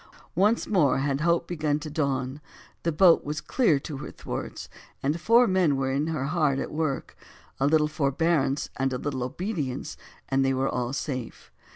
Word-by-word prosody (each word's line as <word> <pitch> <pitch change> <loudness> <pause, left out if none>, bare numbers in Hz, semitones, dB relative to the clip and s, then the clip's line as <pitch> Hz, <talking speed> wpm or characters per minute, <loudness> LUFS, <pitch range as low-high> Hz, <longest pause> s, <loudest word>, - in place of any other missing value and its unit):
Once 205 +6 +2
more 175 -10 +3
had 140 +1 0
hope 170 +1 +2
began 155 -4 0
to 155 +1 -7
dawn: 140 -2 -2 0.4
the 170 - 0
boat 170 +2 +5
was 150 +1 -3
clear 220 - +2
to 145 0 -6
her 135 - -7
thwarts, - - -6 0.4
and 150 +5 0
four 235 +8 +5
men 185 -8 +2
were 135 0 -1
in 140 +3 0
her 155 -5 -2
hard 150 -3 +1
at - - -3
work; 155 -3 -2 0.4
a 135 - +3
little 150 0 +4
forbearance 145 -1 0
and 135 0 0
a - - -1
little 135 0 -3
obedience, 145 - -3 0.3
and 135 0 +2
they 135 0 +2
were 135 +1 0 0.2
safe. 130 -3 -5
150 Hz, 175 wpm, -26 LUFS, 135-165 Hz, 0.4 s, boat